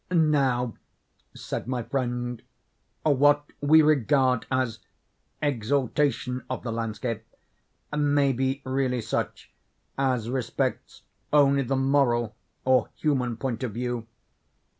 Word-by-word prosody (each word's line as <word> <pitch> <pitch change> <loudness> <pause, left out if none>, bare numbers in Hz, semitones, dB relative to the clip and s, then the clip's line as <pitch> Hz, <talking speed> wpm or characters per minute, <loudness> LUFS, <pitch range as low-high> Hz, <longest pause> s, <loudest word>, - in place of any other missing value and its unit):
"Now," 140 -8 +2 0.6
said - - -5
my 125 -2 -2
friend, 125 -2 -2 0.6
"what 145 0 +4 0.2
we 155 +2 +6
regard 135 -3 +3
as 130 -4 0 0.6
exaltation 130 0 0
of 130 -3 -4
the 115 - -3
landscape 115 0 -3 0.7
may 145 -2 +3
be 135 +2 -1
really 130 -2 0
such, - - -3 0.5
as 130 -4 +1
respects 125 0 -2 0.3
only 140 -2 +5
the 135 +1 -1
moral 130 -4 +2 0.3
or 130 0 +3
human 125 -6 0
point 120 -3 -3
of 120 -5 -3
view. 120 -1 -3
130 Hz, 105 wpm, -26 LUFS, 120-140 Hz, 0.7 s, we